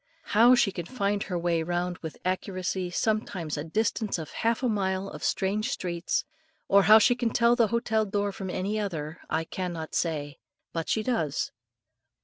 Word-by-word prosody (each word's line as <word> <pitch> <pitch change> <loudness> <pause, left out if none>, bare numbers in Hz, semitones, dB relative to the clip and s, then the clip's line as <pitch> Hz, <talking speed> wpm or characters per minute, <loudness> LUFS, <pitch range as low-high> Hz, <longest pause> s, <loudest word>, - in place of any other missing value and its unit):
How 235 +4 +7
she 220 -5 +3
can 175 -2 -6
find 205 -5 -1
her 180 -3 -2
way 170 -1 +1
round 175 +2 -2
with 160 -2 -7
accuracy, 185 0 -2
sometimes 185 -5 -1
a 145 - -3
distance 215 +5 -1
of 160 -3 -7
half 230 +3 0
a - - +3
mile 195 -3 0
of - - -8
strange 205 +2 0
streets, 170 -1 -2 0.4
or 200 0 +6
how 215 - +11
she 220 +3 +5
can 240 -1 -1
tell 235 +1 +4
the 235 -3 +4
hotel 220 -1 +1
door 205 0 -1
from 190 -1 -6
any 200 +4 -1
other, 165 -6 -4
I 160 +1 0
cannot 170 -2 -5
say; 150 -4 -2 0.3
but 165 -1 -3
she 220 - +1
does. 170 - -1
190 Hz, 175 wpm, -27 LUFS, 170-215 Hz, 0.4 s, how